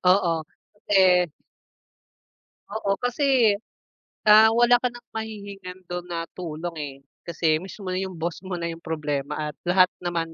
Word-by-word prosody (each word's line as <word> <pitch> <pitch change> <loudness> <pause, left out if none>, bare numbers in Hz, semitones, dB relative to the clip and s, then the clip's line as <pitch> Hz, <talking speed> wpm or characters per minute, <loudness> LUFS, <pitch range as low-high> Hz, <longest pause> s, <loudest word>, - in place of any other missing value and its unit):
Oo, 170 -4 +3 0.5
eh 185 -2 +6 1.5
Oo, 200 -2 0
kasi 245 -4 +3 0.7
Ah, 215 +1 +8
wala 240 +1 +4
ka 250 - +1
ng 240 0 -13
mahihingan 200 -4 -7
do'n 175 0 -6
na 165 -1 -3
tulong, 170 -1 -5
eh. 140 -2 -5 0.3
Kasi 160 -1 0
mismo 190 +2 -9
na 185 - -1
'yong 190 -2 -5
boss 170 +2 -3
mo 185 -1 -5
na 170 - -3
'yong 165 0 -5
problema 150 -3 -3
at 150 -1 -4
lahat 180 +1 +5 0.2
naman 170 -2 -2
180 Hz, 145 wpm, -25 LUFS, 165-210 Hz, 1.5 s, Ah